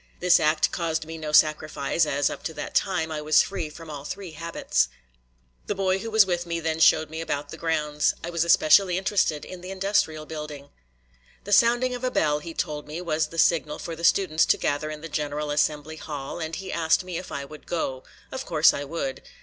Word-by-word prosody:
This 180 0 +5
act 155 0 +2
caused 160 -2 -2
me 160 +1 -7
no 155 -1 -4
sacrifice, 155 +1 +2
as, 145 0 +1
up - - -7
to 160 - -4
that 150 - -6
time, 180 -5 0
I 155 -1 -3
was 155 +1 +5
free 180 -6 -4
from 160 +1 -10
all 145 -2 -7
three 185 +4 -6
habits. 165 +2 0 0.8
The 205 - -1
boy 190 -1 +1
who 225 - -5
was 220 -2 +6
with 175 -2 -2
me 170 0 -2
then 160 -1 -2
showed 155 -1 +4
me 160 +1 -4
about 145 -3 -3
the - - -8
grounds. 150 -2 0
I 170 - -4
was 170 -1 +1
especially 175 +2 +5
interested 190 -6 0
in 185 -1 -9
the 180 - -8
industrial 190 -5 0
building. 150 -2 -7 0.7
The 205 - -2
sounding 240 +3 +4
of 250 0 -6
a 255 - +1
bell, 150 -9 +1
he 165 +2 -9
told 150 -1 -3
me, 155 +3 -5
was 160 -3 0
the 165 - -11
signal 155 -3 +2
for 165 - -6
the 165 - -10
students 170 -3 +3
to - - +4
gather 145 +2 -1
in 155 0 -7
the 165 - -6
general 150 -1 -3
assembly 150 +1 0
hall, 145 -1 -6
and 160 -1 -4
he 190 +3 -6
asked 165 +3 +2
me 180 -2 -4
if 185 - -10
I 140 0 -4
would 150 +2 -13
go. 135 -6 -3 0.3
Of 265 - -4
course 160 - +4
I 140 - -3
would. 170 - -4
160 Hz, 220 wpm, -25 LUFS, 150-180 Hz, 0.8 s, was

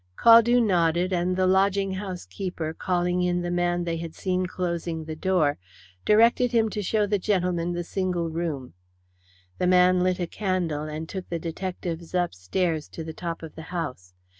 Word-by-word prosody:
Caldew 235 +1 +7
nodded, 175 -2 +2
and 180 +1 +1
the 185 - +3
lodging 195 +1 +2
house 190 -2 -5
keeper, 175 -5 -4
calling 180 +1 0
in 175 0 0
the 175 - -2
man 175 0 0
they 170 -1 -2
had 165 -1 -7
seen 185 -1 -1
closing 170 -3 -3
the 160 0 -5
door, 160 - +1 0.5
directed 230 +3 +4
him 225 -2 +3
to 210 - -3
show 210 +2 +1
the 205 0 0
gentlemen 180 -3 0
the 175 0 -2
single 180 -1 -1
room. 160 - -4 0.9
The 180 - +2
man 180 0 +5
lit 185 0 +1
a 175 - 0
candle, 175 -6 -2
and 155 +1 -5
took 190 0 -6
the 170 - -2
detectives 170 0 -5
upstairs 165 - -1
to 165 - -7
the 160 0 -7
top 170 0 -5
of 160 - -8
the - - -9
house. 125 - -5
175 Hz, 175 wpm, -25 LUFS, 165-185 Hz, 0.9 s, Caldew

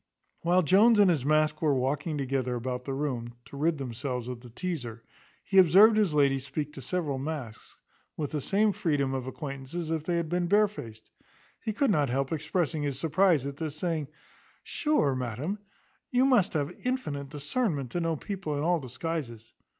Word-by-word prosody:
While 180 +2 +3
Jones 210 +8 +5
and 200 -3 +6
his 150 -7 0
mask 155 +1 +2
were 150 -3 +3
walking 140 +4 -1
together 130 -2 -1
about 125 +1 -4
the 135 - -3
room, 125 -5 -3
to - - -12
rid 155 +3 +1
themselves 125 -1 -4
of 125 -2 -6
the 120 - -12
teazer, 125 -6 -5 0.4
he 195 - +4
observed 195 +6 +7
his 205 -8 +2
lady 140 -2 +3
speak 140 +3 -4
to 135 - -8
several 145 0 -2
masks, 135 -6 -6 0.4
with 150 -3 -3
the 150 - -2
same 210 +7 +2
freedom 145 -7 0
of 130 -1 -3
acquaintance 135 +1 -7
as 165 -2 -3
if 160 -2 -1
they 175 +1 -1
had 170 -1 -1
been 175 +1 0
barefaced. 195 - 0 0.5
He 220 - -1
could 240 +3 +1
not 145 -7 +2
help 135 +2 -1
expressing 160 0 -1
his 140 -3 -2
surprize 160 0 +2
at 140 0 -5
this; 155 -2 -4
saying, 160 -3 -2 0.6
"Sure, 295 - +1
madam, 130 - -3 0.5
you 255 +1 +3
must 250 -8 +3
have 145 -3 -2
infinite 150 - -2
discernment, 145 - -2
to 175 - -1
know 165 -1 0
people 180 -3 -4
in 145 - -1
all 175 +1 +2
disguises." 130 -4 -5
150 Hz, 180 wpm, -28 LUFS, 135-175 Hz, 0.6 s, observed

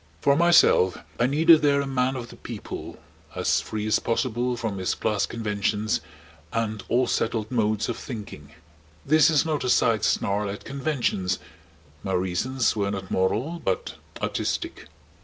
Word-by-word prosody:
For 140 - +3
myself 170 - +5 0.2
I 120 - +4
needed 160 +3 +6
there 140 -1 +3
a 140 - -1
Man 130 -1 0
of 120 -2 -6
the - - -11
People - - -8 0.4
as - - +1
free 105 -1 -4
as 110 - +2
possible 120 +1 -1
from 110 -4 -3
his 95 - -1
class 105 -2 0
conventions 105 -1 -1 0.5
and 110 -2 -2
all 125 +2 +3
settled 110 -2 -1
modes 110 -2 +1
of 120 - -3
thinking. 100 - -8 0.5
This 155 +2 +5
is 155 -1 +3
not 155 -2 -1
a 125 - -1
side 115 -4 +3
snarl 100 +1 +1
at 100 - -7
conventions. 135 -10 -1 0.6
My 95 - -3
reasons 95 +9 0
were 100 -2 0
not 95 -2 -5
moral 115 - 0
but 95 - -2 0.3
artistic. - - -3
115 Hz, 155 wpm, -25 LUFS, 105-135 Hz, 0.6 s, needed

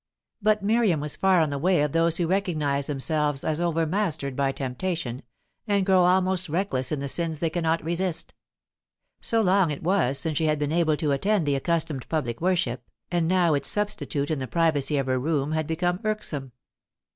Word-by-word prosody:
But 210 0 +2
Miriam 210 -6 +2
was 150 0 -4
far 190 -3 +3
on 155 -2 +1
the 140 - -2
way 175 -1 +3
of 150 - -1
those 165 +1 +2
who 175 - +1
recognize 155 -7 0
themselves 145 0 -1
as 155 +1 0
overmastered 165 -3 -1
by 140 0 +1
temptation, 135 0 -3 0.5
and 200 -2 +2
grow 185 -2 +4
almost 185 -1 +2
reckless 150 -7 -1
in 150 - -1
the 140 - -3
sins 160 +1 -1
they 165 -1 -1
cannot 165 -1 0
resist. 175 +1 -2 0.9
So 225 -1 +1
long 190 -3 +3
it 145 0 -5
was 165 -7 +1
since 160 -1 -1
she 160 - +1
had 155 0 +2
been 145 0 -2
able 160 -2 +2
to 150 -2 0
attend 195 +5 +1
the 145 -1 +1
accustomed 155 -2 -1
public 130 -7 -2
worship, 170 -9 0 0.3
and 170 -2 +1
now 175 -2 +3
its 140 -2 +1
substitute 165 -8 -1
in 155 - -1
the 130 - -4
privacy 155 -3 +1
of 135 - 0
her 130 -1 0
room 145 +1 -1
had 155 -1 -1
become 175 +2 -1
irksome. 155 - -3
160 Hz, 190 wpm, -25 LUFS, 145-180 Hz, 0.9 s, grow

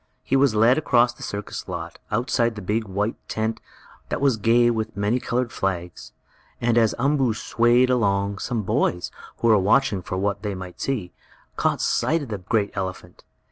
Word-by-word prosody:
He 135 - 0
was 135 -4 +3
led 115 +6 +5
across 120 -5 +3
the - - -17
circus 100 0 -5
lot, - - -6
outside 115 0 0
the 105 - -6
big, 110 +4 -1
white 105 +3 -2
tent, 110 +1 -2 0.5
that - - -2
was 140 -3 +3
gay 115 +3 +3
with 110 -2 -3
many 105 +5 +1
colored 125 0 -1
flags, 90 -3 -4 0.5
and 120 -1 +1
as 115 -2 +3
Umboo 135 -3 +1
swayed 120 +3 +3
along, 100 -4 +1
some 115 -3 -2
boys, 90 -1 0 0.3
who 115 - +3
were 110 -2 +6
watching 105 +1 +2
for 95 - -4
what 100 +1 -1
they 105 -2 -3
might 90 -1 -9
see, 115 -10 -2 0.4
caught - - 0
sight 165 -1 +1
of 135 - -9
the 105 -3 -4
great 100 +2 0
elephant. 95 -2 -6
110 Hz, 180 wpm, -23 LUFS, 100-120 Hz, 0.5 s, were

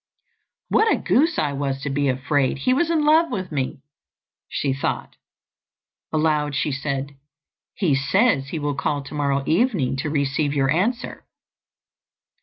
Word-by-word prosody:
"What 440 +1 +3
a - - +4
goose 315 +4 +2
I 145 -2 0
was 135 -1 -2
to 140 - -2
be 140 0 +1
afraid 135 +1 0
he 255 - +1
was 325 +5 +1
in 320 -3 +2
love 320 +2 +5
with 185 -3 -4
me!" 135 -2 -3 0.7
she 140 -2 -1
thought. 135 - -3 1.0
Aloud 150 -2 +1
she 150 - 0
said, 140 0 -3 0.6
"He 180 -8 +1
says 135 - +2
he 160 - -4
will 145 -1 -1
call 140 +1 -2
tomorrow 140 -1 -1
evening 170 - +1
to 150 +3 -2
receive 145 0 0
your 135 -1 +2
answer." 225 - -1
145 Hz, 145 wpm, -22 LUFS, 135-190 Hz, 1.0 s, love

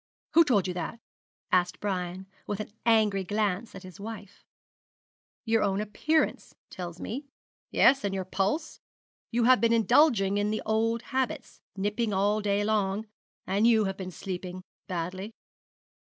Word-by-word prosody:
'Who 335 - +8
told 210 - +2
you 180 - -2
that?' 180 +5 -4 0.5
asked 180 -1 +2
Brian, 185 -2 -3 0.2
with 205 - -3
an 215 - -5 0.2
angry 215 -4 +4
glance 205 +2 -1
at 190 - -9
his 185 +1 -12
wife. 205 -2 -9 1.0
'Your 225 -1 +2
own 195 -1 +1
appearance 295 +10 0 0.2
tells 175 -2 -7
me 270 +6 -5 0.4
yes, 270 0 +4
and 200 - 0
your 190 -1 -3
pulse. 200 - -1 0.5
You 235 +1 +1
have 255 +1 +5
been 230 0 +4
indulging 215 - +4
in 205 0 +1
the 215 - -2
old 225 +2 +1
habits 265 -1 -2
nipping 210 +2 -1
all 205 +2 +2
day 205 0 +1
long; 205 -1 0 0.4
and 200 +4 +2
you 225 -2 +5
have 195 0 -2
been 185 -1 -5
sleeping 185 0 -6 0.2
badly.' 185 +4 -4
205 Hz, 150 wpm, -28 LUFS, 190-225 Hz, 1.0 s, Who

